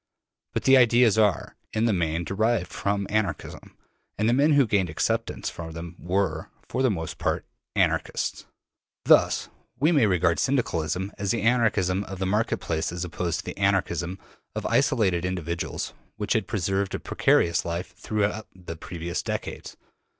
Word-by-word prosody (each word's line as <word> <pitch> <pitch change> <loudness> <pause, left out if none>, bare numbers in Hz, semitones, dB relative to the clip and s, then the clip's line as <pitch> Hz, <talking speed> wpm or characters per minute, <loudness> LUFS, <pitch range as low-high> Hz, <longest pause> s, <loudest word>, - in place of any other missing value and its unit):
But - - -1
the 135 0 +7
ideas 120 -3 +5
are, 105 -6 +1 0.2
in 110 +1 +1
the 115 - +3
main, 85 -2 0
derived 100 0 0
from 100 0 -1
Anarchism, 105 -1 -3 0.4
and 105 - +1
the 120 - +4
men 145 +4 +4
who 140 -2 +5
gained 100 -5 +1
acceptance 75 - -1
for 80 -1 -7
them 85 +1 -7
were, 95 +3 -1 0.2
for 130 - -2
the 130 - +4
most 80 -6 -4
part, - - -1 0.3
Anarchists. - - 0 0.6
Thus - - +4 0.3
we 155 +5 +4
may 140 -10 +4
regard 85 -3 +2
Syndicalism 95 - 0
as 100 -1 -2
the 115 - 0
Anarchism 105 -5 +2
of 95 +1 -7
the 95 - -2
market 105 +4 +1
place 80 0 -2
as 90 0 -3
opposed 85 -1 -2
to - - -25
the - - -6
Anarchism 95 -2 0 0.4
of - - -3
isolated 95 -6 +2
individuals 85 -2 -3 0.2
which - - 0
had - - 0
preserved 95 +2 -1
a - - -3
precarious 85 0 +2
life 85 +2 -4
throughout 105 0 -1
the 90 -3 -8
previous 85 +1 -4
decades. - - -5
95 Hz, 160 wpm, -26 LUFS, 85-110 Hz, 0.6 s, the